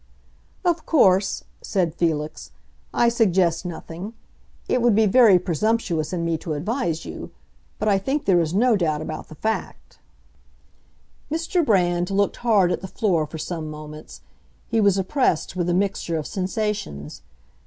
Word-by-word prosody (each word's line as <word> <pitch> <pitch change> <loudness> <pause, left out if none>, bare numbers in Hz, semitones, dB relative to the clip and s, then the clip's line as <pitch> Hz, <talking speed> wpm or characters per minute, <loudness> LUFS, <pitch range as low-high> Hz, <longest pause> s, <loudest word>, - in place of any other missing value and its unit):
"Of 340 -3 0
course," 190 - +3 0.2
said 180 -6 0
Felix, 155 -3 -2 0.4
"I 240 - +3
suggest 190 -7 +2
nothing; 175 +5 -7 0.5
it 250 - +1
would 235 -3 +4
be 220 +1 +4
very 215 -2 +6
presumptuous 180 -2 0
in 170 -2 -2
me 165 -1 0
to 160 - -4
advise 170 - -2
you. - - -7 0.5
But 215 - -2
I 200 -2 +4
think 270 +9 -2
there 185 -3 +4
is 160 -2 0
no 230 +5 +3
doubt 155 -5 0
about 155 0 -6
the 155 - -12
fact." 220 +8 -4 1.3
Mr. 330 +2 0
Brand 175 - +2
looked 200 0 +1
hard 205 -7 +3
at - - -2
the 190 - -6
floor 180 -7 0
for 160 - -8
some 160 0 -4
moments; 150 0 -10 0.5
he 225 -1 +1
was 200 -2 +4
oppressed 190 - 0
with 175 -1 -1
a - - +2
mixture 190 -3 -1
of 155 - -4
sensations. 185 - -3
185 Hz, 155 wpm, -23 LUFS, 165-220 Hz, 1.3 s, very